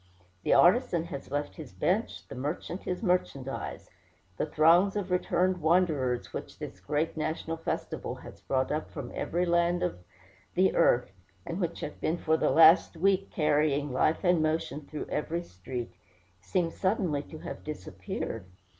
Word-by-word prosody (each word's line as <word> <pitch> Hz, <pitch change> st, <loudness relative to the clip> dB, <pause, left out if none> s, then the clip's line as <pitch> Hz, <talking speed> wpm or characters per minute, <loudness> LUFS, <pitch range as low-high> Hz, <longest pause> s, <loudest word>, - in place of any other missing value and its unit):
The -, -, +3 dB
artisan 175 Hz, -3 st, +4 dB
has 140 Hz, -5 st, -7 dB
left 145 Hz, +1 st, -3 dB
his -, -, -9 dB
bench, -, -, -1 dB
the -, -, -8 dB
merchant 150 Hz, +7 st, -4 dB
his 180 Hz, +4 st, -3 dB
merchandise; 140 Hz, -, -2 dB, 0.4 s
the -, -, -1 dB
throngs 170 Hz, +6 st, +5 dB
of 195 Hz, -3 st, -2 dB
returned 180 Hz, 0 st, +1 dB
wanderers 155 Hz, -7 st, +1 dB
which -, -, -6 dB
this -, -, -7 dB
great 150 Hz, +2 st, -1 dB
national 160 Hz, +1 st, -2 dB
festival 165 Hz, -, -3 dB
has -, -, -12 dB
brought 130 Hz, -1 st, 0 dB
up 155 Hz, +1 st, -2 dB
from 140 Hz, -5 st, -7 dB
every 175 Hz, +2 st, -1 dB
land 170 Hz, 0 st, +2 dB
of 90 Hz, -, -2 dB, 0.6 s
the 190 Hz, +2 st, +4 dB
earth, 120 Hz, -4 st, +3 dB, 0.3 s
and 170 Hz, -, -4 dB
which 170 Hz, -1 st, -2 dB
have 150 Hz, -, -6 dB
been 165 Hz, -, 0 dB
for 160 Hz, -1 st, +2 dB
the -, -, +2 dB
last 165 Hz, +1 st, +6 dB
week 195 Hz, +2 st, +2 dB
carrying 150 Hz, -2 st, +1 dB
life 155 Hz, +7 st, +2 dB
and 175 Hz, -3 st, +4 dB
motion 155 Hz, -1 st, -1 dB
through 155 Hz, -, -5 dB
every 165 Hz, +3 st, -2 dB
street, 115 Hz, -, -6 dB, 0.5 s
seem 170 Hz, -, 0 dB
suddenly 185 Hz, -7 st, 0 dB
to 155 Hz, -, -11 dB
have -, -, -7 dB
disappeared. 95 Hz, -5 st, -5 dB
160 Hz, 155 wpm, -29 LUFS, 145-175 Hz, 0.6 s, last